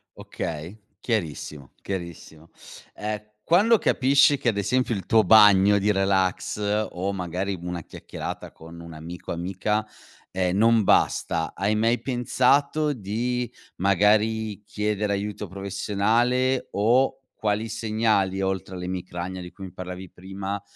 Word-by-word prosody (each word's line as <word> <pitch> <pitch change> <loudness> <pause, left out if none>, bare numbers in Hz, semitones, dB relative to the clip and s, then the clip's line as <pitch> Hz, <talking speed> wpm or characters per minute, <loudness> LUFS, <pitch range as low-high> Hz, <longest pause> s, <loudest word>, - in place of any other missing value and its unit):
Okay, 80 +4 -6 0.2
chiarissimo, 75 - -4
chiarissimo. 85 -3 -7 0.5
Ehm, 105 0 -4 0.2
quando 210 +7 +5
capisci 140 -3 +4
che 125 - +1
ad 105 - -2
esempio 125 +4 +1
il 95 - -5
tuo 110 -1 +4
bagno 105 -1 +7
di 100 +1 +2
relax 100 +2 0
o, 95 +3 -3
magari, 95 +1 -3
una 90 -1 -5
chiacchierata - - -7
con 80 +1 -13
un 85 -1 -10
amico 85 +3 -8
amica, 95 +5 -1 0.5
ehm, 95 0 0
non 115 +1 +4
basta, 80 -3 +1
hai 100 +3 0
mai 115 +3 +1
pensato 140 +4 +1
di 120 +3 -2 0.3
magari 105 +2 +2
chiedere 105 0 -1
aiuto 105 +1 -4
professionale 110 +7 0
o 120 +6 +2 0.2
quali 110 +1 -1
segnali 105 -3 0
oltre 95 -1 -2
all'emicrania, 90 0 -5
di 90 0 -9
cui 95 +2 -10
mi 95 - -9
parlavi 90 0 -7
prima, 95 +2 -6
100 Hz, 125 wpm, -25 LUFS, 95-110 Hz, 0.5 s, bagno